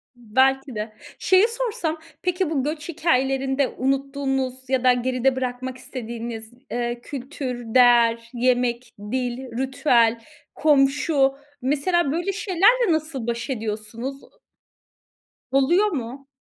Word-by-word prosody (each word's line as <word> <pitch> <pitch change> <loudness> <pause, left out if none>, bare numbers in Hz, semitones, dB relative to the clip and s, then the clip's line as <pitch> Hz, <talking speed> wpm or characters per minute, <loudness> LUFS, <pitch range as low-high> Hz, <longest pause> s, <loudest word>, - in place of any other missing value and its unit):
Belki 260 +3 +1
de. 215 +1 -4 0.3
Şeyi 375 +3 +5
sorsam, 460 -9 -2 0.2
peki, 360 -1 0
bu 290 -5 0
göç 300 +2 -4
hikâyelerinde 270 -4 +1
unuttuğunuz 270 -1 -2
ya 260 -2 +1
da 255 -1 +6
geride 255 +1 +1
bırakmak 255 0 -4
istediğiniz, 235 -2 -7 0.2
eee, 240 0 -2
kültür, 255 -4 -6
değer, 235 -2 +5
yemek, 245 0 0 0.2
dil, 250 -1 -1 0.2
ritüel, 250 -4 +2 0.3
komşu... 275 -1 +3 0.3
Mesela 290 +4 +1
böyle 345 +5 -1
şeylerle 405 +3 +3
nasıl 305 -6 -3
baş 235 +3 -3
ediyorsunuz? 225 +3 -4
U - - -22 1.1
Oluyor 335 +10 +4
mu? 265 -1 -5
265 Hz, 110 wpm, -23 LUFS, 245-295 Hz, 1.1 s, da